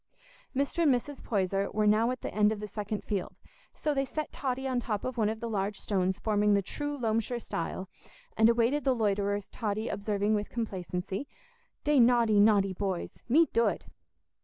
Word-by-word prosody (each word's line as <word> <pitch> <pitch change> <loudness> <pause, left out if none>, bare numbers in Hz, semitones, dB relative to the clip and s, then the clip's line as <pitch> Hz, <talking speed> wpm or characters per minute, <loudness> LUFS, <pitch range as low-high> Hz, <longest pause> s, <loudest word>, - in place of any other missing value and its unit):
Mr. 280 +5 0
and 310 -4 +5
Mrs. 265 +3 -2
Poyser 195 -2 0
were 215 0 +1
now 215 +3 +4
at 255 0 -3
the - - -5
end 210 0 +4
of 215 - -3
the 210 - -5
second 210 0 -4
field, 200 -4 -3 0.4
so 300 - -1
they 275 -1 +1
set 305 +3 -4
Totty 265 0 -2
on 255 -2 0
the - - -6
top 210 -3 -2
of 255 - -3
one 220 -3 +2
of 220 0 -4
the 235 - -4
large 205 -2 -2
stones 190 -2 0
forming 210 -1 +2
the 200 - +1
true 290 +8 -4
Loamshire 230 0 -1
stile, 185 -2 -4 0.5
and 220 +1 +5
awaited 240 +5 +2
the 265 -1 +2
loiterers; 205 -2 0
Totty 215 0 -3
observing 205 +1 0
with 210 -1 -1
complacency, 190 0 -4 0.6
"Dey 295 -2 +3
naughty, 235 -3 +5
naughty 205 -2 +4
boys—me 205 - +1
dood." 230 0 +1
215 Hz, 185 wpm, -30 LUFS, 205-245 Hz, 0.6 s, and